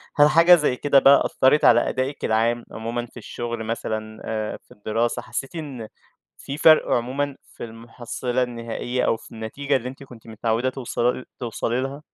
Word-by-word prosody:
هل 145 Hz, 0 st, +6 dB
حاجة 170 Hz, +3 st, +7 dB
زي 150 Hz, -6 st, +1 dB
كده 140 Hz, +1 st, +4 dB
بقى 140 Hz, +1 st, +6 dB
أثّرِت 135 Hz, +3 st, +3 dB
على 120 Hz, 0 st, +5 dB
أدائِك 130 Hz, +2 st, -3 dB
العام 115 Hz, +2 st, +1 dB
عمومًا 115 Hz, +2 st, -4 dB
في 120 Hz, -, -17 dB
الشُغل 120 Hz, 0 st, -5 dB
مثلًا، 110 Hz, -1 st, -4 dB
آآ 110 Hz, -1 st, -3 dB
في -, -, -30 dB
الدراسة، 115 Hz, +3 st, -2 dB
حسّيتِ 135 Hz, +7 st, -5 dB
إن 135 Hz, -8 st, -6 dB, 0.5 s
فيه 140 Hz, -, -7 dB
فَرْق 155 Hz, 0 st, +6 dB
عمومًا 135 Hz, +4 st, -1 dB, 0.2 s
في -, -, -8 dB
المُحصِّلة 120 Hz, +2 st, -4 dB
النهائية 120 Hz, +1 st, -3 dB
أو 115 Hz, -, +1 dB
في -, -, -16 dB
النتيجة 115 Hz, +6 st, -2 dB
اللي 125 Hz, -1 st, -2 dB
أنتِ 135 Hz, +2 st, -11 dB
كنتِ 120 Hz, -4 st, -15 dB
متعوّدة 115 Hz, +3 st, -1 dB
توصلل 125 Hz, -1 st, -2 dB
توصلي 120 Hz, +1 st, -2 dB
لها؟ 135 Hz, +2 st, -5 dB
120 Hz, 170 wpm, -23 LUFS, 115-135 Hz, 0.5 s, حاجة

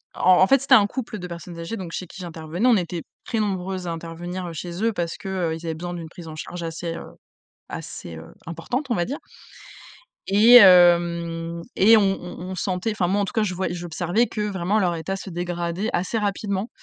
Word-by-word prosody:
en 185 Hz, 0 st, +5 dB
en 190 Hz, -, +6 dB
fait, 275 Hz, +2 st, +4 dB
c'était 275 Hz, -, +6 dB
un 205 Hz, -, +6 dB
couple 225 Hz, -1 st, -5 dB
de 180 Hz, -, -6 dB
personnes 170 Hz, 0 st, -8 dB
âgées, 165 Hz, +7 st, -4 dB
donc 180 Hz, -3 st, -7 dB
chez 185 Hz, -, -4 dB
qui 190 Hz, -, -11 dB
j'intervenais. 170 Hz, +4 st, -2 dB
On 240 Hz, -3 st, +6 dB
était 175 Hz, -2 st, -3 dB, 0.2 s
très 225 Hz, -, -2 dB
nombreuses 190 Hz, -3 st, -2 dB
à -, -, -2 dB
intervenir, 170 Hz, +2 st, -6 dB
heu, 170 Hz, -, -6 dB
chez 175 Hz, +4 st, -5 dB
eux. 230 Hz, 0 st, +2 dB
Parce 170 Hz, -4 st, -3 dB
que, -, -, -9 dB
heu, 175 Hz, -4 st, -1 dB
ils 165 Hz, +1 st, -9 dB
avaient 160 Hz, -1 st, -2 dB
besoin 175 Hz, +2 st, -5 dB
d'une 165 Hz, -2 st, -7 dB
prise 170 Hz, 0 st, -11 dB
en 155 Hz, -, -8 dB
charge 175 Hz, +3 st, -7 dB
assez, 165 Hz, +1 st, -4 dB
heu, -, -, -7 dB, 0.6 s
assez, 85 Hz, -, -7 dB
heu, 80 Hz, 0 st, -10 dB, 0.2 s
importante, 205 Hz, -, -4 dB
on -, -, +3 dB
va 175 Hz, -, +1 dB
dire 285 Hz, -, -4 dB, 1.1 s
et 215 Hz, +5 st, +7 dB
hem, 170 Hz, -3 st, +5 dB
et 220 Hz, +4 st, +7 dB
on -, -, +4 dB
on 195 Hz, -3 st, -2 dB
on -, -, -4 dB
sentait, 185 Hz, +3 st, -2 dB
enfin, 200 Hz, -4 st, 0 dB
moi 200 Hz, +3 st, +1 dB
en -, -, +1 dB
tout -, -, -7 dB
cas, 220 Hz, -, +2 dB
je 190 Hz, -3 st, -1 dB
vois 185 Hz, +1 st, -2 dB
j'observais 175 Hz, +5 st, 0 dB
que 210 Hz, -, -4 dB
vraiment, 200 Hz, 0 st, 0 dB
leur 180 Hz, -4 st, +1 dB
état 170 Hz, +4 st, -3 dB
se 195 Hz, 0 st, -7 dB
dégradait 175 Hz, +3 st, -3 dB
assez 185 Hz, +6 st, -1 dB
rapidement 205 Hz, 0 st, -2 dB
180 Hz, 225 wpm, -23 LUFS, 170-200 Hz, 1.1 s, et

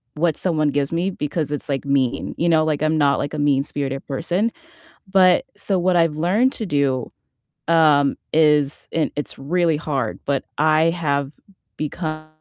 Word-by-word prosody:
what 160 Hz, 0 st, 0 dB
someone 155 Hz, -5 st, 0 dB
gives 145 Hz, -1 st, -1 dB
me 175 Hz, +3 st, 0 dB
because 150 Hz, -3 st, -3 dB
it's, 145 Hz, -, -4 dB
like, 135 Hz, -1 st, -1 dB
mean. 135 Hz, -3 st, 0 dB
You 170 Hz, -, 0 dB
know? 160 Hz, -1 st, +4 dB
Like, 155 Hz, -2 st, -1 dB
I'm 155 Hz, +1 st, +1 dB
not 140 Hz, -2 st, +3 dB
like 145 Hz, -, -3 dB
a 150 Hz, -, -3 dB
mean-spirited 140 Hz, -1 st, -1 dB
person. 175 Hz, -, -1 dB, 0.6 s
But, 185 Hz, +4 st, +4 dB
so 195 Hz, -, 0 dB
what 180 Hz, 0 st, +1 dB
I've 165 Hz, -3 st, +2 dB
learned 200 Hz, +11 st, +2 dB
to 220 Hz, -, -4 dB
do, 140 Hz, -6 st, 0 dB, 0.6 s
um, 150 Hz, -4 st, +4 dB, 0.2 s
is 150 Hz, -2 st, +2 dB
and 160 Hz, -2 st, 0 dB
it's 145 Hz, -, -5 dB
really 165 Hz, +3 st, +1 dB
hard. 140 Hz, -7 st, -3 dB
But 140 Hz, -2 st, -1 dB
I 155 Hz, +1 st, +3 dB
have 140 Hz, -5 st, -1 dB, 0.5 s
become, 155 Hz, 0 st, -4 dB
155 Hz, 165 wpm, -21 LUFS, 140-170 Hz, 0.6 s, know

